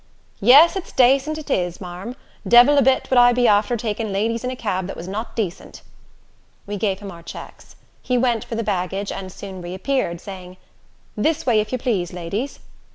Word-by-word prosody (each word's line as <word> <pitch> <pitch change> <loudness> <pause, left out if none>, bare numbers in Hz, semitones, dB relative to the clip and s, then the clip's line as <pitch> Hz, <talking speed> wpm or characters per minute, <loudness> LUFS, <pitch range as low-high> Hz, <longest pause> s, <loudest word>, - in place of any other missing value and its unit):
"Yes, 280 - +7
it's 385 - -5
dacent 270 +4 +3
it 300 -2 -7
is, 180 -4 -1
marm. 185 +6 -7 0.3
Devil 245 +5 +7
a - - +5
bit 265 0 +2
would 255 - +5
I 245 0 +6
be 245 0 +3
after 210 +3 +3
takin' 220 -1 -3
ladies 225 +4 -1
in 250 - -2
a 255 - -4
cab 190 -6 -3
that - - -6
was 170 - -7
not 215 +5 -5
dacent." 195 -5 -5 0.8
We 205 - -5
gave 200 -1 -1
him 200 0 -9
our 170 -2 -12
checks. - - -11 0.3
He 250 - 0
went 240 -3 +1
for 230 - -6
the 230 - -2
baggage, 195 0 -2
and 190 -1 -6
soon 190 -1 -9
reappeared, 185 +1 -2
saying, 185 -1 -10 0.6
"This 300 +9 0
way, 230 -4 +3
if 215 0 -2
you 255 - 0
plase, 210 -9 -2
ladies." 195 +10 -4
215 Hz, 195 wpm, -21 LUFS, 190-250 Hz, 0.8 s, Yes